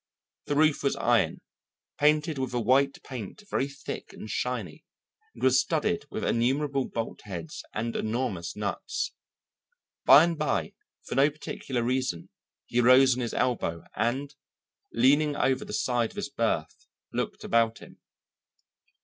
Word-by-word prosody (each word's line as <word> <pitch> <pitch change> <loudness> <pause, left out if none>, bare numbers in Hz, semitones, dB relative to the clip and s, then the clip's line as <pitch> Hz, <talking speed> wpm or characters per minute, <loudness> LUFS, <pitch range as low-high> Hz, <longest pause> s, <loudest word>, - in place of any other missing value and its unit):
The 145 - 0
roof 155 0 +3
was 140 - +1
iron, - - +2 0.6
painted 150 0 +3
with 130 -2 -2
a - - +2
white 135 +4 +2
paint 130 - -7
very 135 - +1
thick 135 -1 -8
and - - -9
shiny, 110 -6 -3 0.5
and 115 - -10
was 130 0 +5
studded 170 +9 -1
with - - -4
innumerable 135 +3 +1
bolt 115 -1 -4
heads 85 -6 -6
and 115 +2 -3
enormous 110 -6 -2
nuts. - - -3 0.9
By 145 - +10
and 170 -2 -1
by, 150 -3 -1 0.3
for - - -5
no 140 +3 +5
particular 135 -4 -4
reason, 125 -8 -1 0.4
he 120 - +1
rose 130 +1 +6
on 125 - -3
his 120 - -3
elbow 85 -10 0
and, 130 +7 -1 0.6
leaning 145 - +3
over 130 -1 +1
the - - -9
side 120 -3 0
of - - -17
his - - -4
berth, 115 - -2 0.3
looked - - -3
about 115 -1 +2
him. - - -14
130 Hz, 145 wpm, -28 LUFS, 115-140 Hz, 0.9 s, By